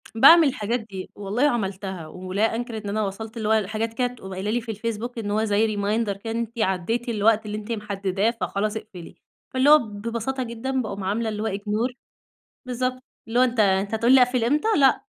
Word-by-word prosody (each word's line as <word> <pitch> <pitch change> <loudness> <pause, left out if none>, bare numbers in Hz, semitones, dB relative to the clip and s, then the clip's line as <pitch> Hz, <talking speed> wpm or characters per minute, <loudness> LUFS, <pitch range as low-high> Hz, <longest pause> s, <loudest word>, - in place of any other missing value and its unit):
باعمل 325 +7 +8
الحاجات 235 -2 -1
دي، 195 -4 -8
والله 205 +6 -2
عملتها، 190 - -3
ولا 185 +6 -1
أنكِر 235 -1 -4
إن 210 -2 -5
أنا 215 +2 -1
وصلت 220 +4 -5
اللي 220 -2 -2
هو 215 -3 +3
حاجات 225 +1 -2
كده 245 +2 +1
تقوم 230 -6 -9
قايلة 190 +3 -2
لي 240 +2 0
في 230 -1 -5
الفيسبوك، 230 +3 -4
إن 205 -2 -3
هو 215 +1 +1
زي 215 0 +1
reminder 210 +2 0
كده، 225 +3 -6
إن - - -2
أنتِ 235 0 -5
عدّيتِ 220 +5 0
الوقت 220 0 +2
اللي 210 0 -4
أنتِ 215 +2 -7
محدّداه 200 0 -1
فخلاص 210 +2 -1
اقفلي، 190 -6 -10 0.4
فاللي 260 +2 +3
هو 305 +1 +9
ببساطة 230 +4 -4
جدًا 255 +3 -2
باقوم 200 -3 -5
عاملة 220 +4 -1
اللي 210 0 -3
هو - - 0
ignore، 215 +5 -1 0.7
بالضبط 255 +1 -2 0.3
اللي 230 +2 0
هو 255 - +6
أنتَ 245 -3 0
أنتَ 195 +1 +2
هتقول 230 +4 +4
لي 260 - +8
أقفل 250 -1 +2
إمتى؟! 295 - +1
لأ، 270 -3 +4
220 Hz, 205 wpm, -24 LUFS, 205-240 Hz, 0.7 s, هو